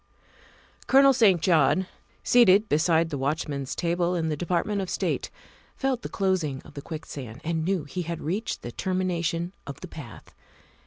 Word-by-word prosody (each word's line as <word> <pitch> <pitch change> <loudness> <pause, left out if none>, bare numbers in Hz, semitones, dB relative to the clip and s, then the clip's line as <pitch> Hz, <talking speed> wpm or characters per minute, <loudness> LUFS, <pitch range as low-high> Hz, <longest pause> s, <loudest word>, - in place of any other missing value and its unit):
Colonel 275 0 +6
St. 210 -8 +5
John, 170 +1 +3 0.4
seated 215 -3 +5
beside 160 +1 +2
the 140 - -3
watchman's 140 -1 -2
table 175 +1 0
in 160 -2 -1
the 155 - 0
Department 180 +5 -1
of 190 - -4
State, - - -1 0.5
felt 265 -3 -1
the - - -6
closing 185 -9 0
of 150 - -15
the 140 - -7
quick 160 +1 -7
sand 125 -3 -8
and 160 0 -1
knew 185 -1 0
he 150 +6 -5
had 170 -1 -4
reached 195 +9 -3
the 120 - -5
termination 175 - -1
of 140 0 -8
the 185 - -7
path. 145 - -11
170 Hz, 165 wpm, -26 LUFS, 150-190 Hz, 0.5 s, Colonel